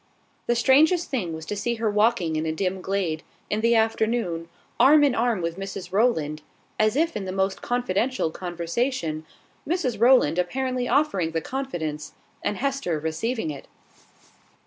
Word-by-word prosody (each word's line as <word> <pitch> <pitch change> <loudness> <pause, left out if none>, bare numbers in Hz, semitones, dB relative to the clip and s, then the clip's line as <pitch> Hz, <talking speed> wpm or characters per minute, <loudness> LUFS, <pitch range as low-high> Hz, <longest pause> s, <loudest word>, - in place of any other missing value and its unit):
The 240 - +2
strangest 305 +8 +4
thing 210 -11 -1
was 160 0 -6
to 210 - -4
see 235 +4 -1
her 225 -1 -1
walking 210 -6 +2
in 155 +1 -1
a - - 0
dim 185 +3 -2
glade, 180 -5 -1 0.3
in 210 - 0
the 230 +1 +3
afternoon, 220 -6 0 0.3
arm 295 +2 +7
in 280 -3 +4
arm 230 -6 0
with 170 +2 -3
Mrs 195 -1 -6
Rowland, 160 -9 +1 0.4
as 215 +2 +3
if 330 +3 +1
in 200 - -3
the 185 - -4
most 190 0 -1
confidential 245 -4 0
conversation, 170 - -3 0.4
Mrs 280 - 0
Rowland 240 - +5
apparently 255 +6 -1
offering 195 - +1
the 165 - +1
confidence, 165 - -4 0.3
and 205 -1 -2
Hester 275 - -1
receiving 160 +5 -2
it. 140 -2 -9
210 Hz, 155 wpm, -25 LUFS, 165-250 Hz, 0.4 s, arm